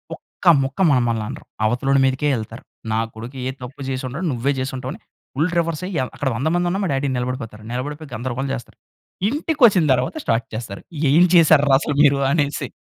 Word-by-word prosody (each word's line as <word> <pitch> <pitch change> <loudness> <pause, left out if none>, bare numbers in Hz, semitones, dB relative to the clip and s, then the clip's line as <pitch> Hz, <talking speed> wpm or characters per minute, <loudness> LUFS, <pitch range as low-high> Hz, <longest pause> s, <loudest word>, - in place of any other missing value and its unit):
ఒక్క - - -18 0.2
ముక్క 135 +4 -5
మమ్మలననరు. 115 -4 -1 0.2
అవతలోడి 135 +4 +2
మీదకే 135 +3 +1
యెళ్తారు. 115 0 -7 0.3
నా 110 - +1 0.2
కొడుకు 115 +4 -8
ఏ - - -1
తప్పు 130 +3 -9
జేసుండడు. 130 +6 -3
నువ్వే 130 +3 0
చేసుంటావని, 130 - -4 0.4
ఫుల్ 160 +5 +1
రివర్స్ 165 -1 -1
అయి - - -6
య - - +2
అక్కడ 140 - -1
100 135 +6 -1
మందున్నా, 175 +2 0
మా - - -1
డ్యాడీ 135 +1 0
నిలబడిపోతారు. 125 -3 -4
నిలబడిపోయి 145 +3 -5
గందరగోళం 130 +4 -3
చేస్తారు. 120 - -8 0.5
ఇంటికొచ్చిన 265 - +3
తర్వాత 125 - -1
స్టార్ట్ 115 +1 0
చేస్తారు. 110 -3 -6 0.3
"ఏం 165 +5 +6
చేశార్రా 155 -5 +6
అసలు 150 - -2
మీరు" 140 -2 +5
అనేసి. 145 -3 0
135 Hz, 165 wpm, -21 LUFS, 125-150 Hz, 0.5 s, ఏం